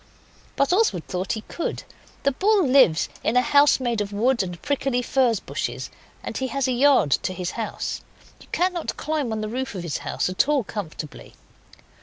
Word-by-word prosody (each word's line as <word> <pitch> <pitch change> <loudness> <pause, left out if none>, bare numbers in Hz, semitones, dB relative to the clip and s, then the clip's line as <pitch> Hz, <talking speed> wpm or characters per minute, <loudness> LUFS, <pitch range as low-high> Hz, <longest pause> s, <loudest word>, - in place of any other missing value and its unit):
But 275 +4 +2
Oswald 365 - +2
thought 185 +1 -2
he 220 - -4
could. 335 - -4 0.4
The 280 - +3
bull 400 +6 +3
lives 255 - +5 0.2
in 230 - +2
a 250 - +5
house 285 0 +5
made 240 -4 -1
of 205 0 -3
wood 235 +4 +2
and 180 -3 -5
prickly 270 -3 0
furze 240 -4 +2
bushes, - - -4 0.3
and - - -5
he 265 - -1
has 265 +2 -1
a - - +1
yard 255 - +4
to 185 - +1
his 180 0 -3
house. 225 -2 -4 0.4
You - - -16
cannot 360 -2 -1
climb 300 -5 -2
on 220 -1 -2
the 215 - -2
roof 250 0 -4
of 180 - -4
his 165 -4 -3
house - - -2
at 185 +9 +1
all 290 -4 +2
comfortably. 165 -8 -7
250 Hz, 190 wpm, -24 LUFS, 200-280 Hz, 0.4 s, lives